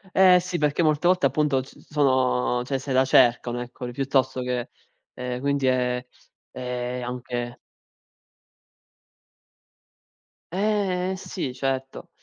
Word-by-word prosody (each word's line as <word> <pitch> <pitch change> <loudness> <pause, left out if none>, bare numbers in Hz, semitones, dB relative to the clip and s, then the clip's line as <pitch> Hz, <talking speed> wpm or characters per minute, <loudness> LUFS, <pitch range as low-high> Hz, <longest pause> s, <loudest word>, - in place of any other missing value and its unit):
Eh 185 -1 +7
sì, 180 0 -3
perché 150 +2 +1
molte 155 +1 +2
volte 180 -6 +4
appunto 140 -1 +1
c 130 - -14
sono 130 -4 +2
cioè 135 0 -1
se 135 +1 -6
la 130 +1 +4
cercano, 120 -1 +3
eccoli, 125 0 -7
piuttosto 130 0 0
che 125 -1 -2 0.4
ehm, 125 0 -4
quindi 140 -1 0
è 125 -1 +1 0.5
è 125 0 -4
anche 120 -1 -4 3.0
Eh 190 -2 0
sì 175 -8 -5
certo. 135 0 -3
130 Hz, 115 wpm, -25 LUFS, 125-150 Hz, 3.0 s, Eh